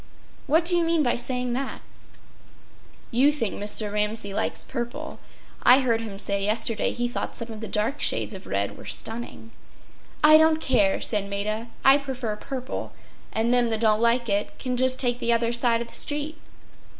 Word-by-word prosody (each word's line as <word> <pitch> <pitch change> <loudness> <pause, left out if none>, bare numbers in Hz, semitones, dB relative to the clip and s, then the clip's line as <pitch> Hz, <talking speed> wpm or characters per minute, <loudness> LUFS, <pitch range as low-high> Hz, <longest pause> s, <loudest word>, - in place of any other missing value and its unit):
What 320 +4 +3
do 350 +1 +3
you 345 - +2
mean 330 -1 +2
by 245 - +1
saying 250 0 -2
that?” 265 +2 -4 1.3
“You 265 +5 +4
think 230 -9 -1
Mr. 205 0 -1
Ramsay 210 -1 0
likes - - 0
purple. 240 +1 -6 0.4
I 260 +2 +6
heard 230 -3 +1
him 210 -3 -6
say 200 0 -1
yesterday 215 +1 +1
he 240 0 -2
thought 240 - -4
some 230 0 -5
of 220 - -8
the 220 - -6
dark 215 +9 -1
shades - - 0
of - - -10
red - - -2
were - - -11
stunning.” 225 0 -6 0.7
“I 310 +1 +8
don’t 315 0 +4
care,” 225 -10 +2
said 205 -2 -1
Maida. 215 +3 -2 0.2
“I 270 +2 +7
prefer 260 -6 -4
purple, 260 +4 -6 0.4
and 230 +2 +1
them 245 -1 +3
that 220 -1 -1
don’t 215 -1 +3
like 235 +1 +2
it 205 0 -1
can 255 -1 -3
just 260 +1 +1
take 245 -2 +1
the 235 -1 0
other 230 0 +1
side 235 -1 +2
of - - -13
the - - -12
street. 300 +2 -1
240 Hz, 185 wpm, -25 LUFS, 215-265 Hz, 1.3 s, I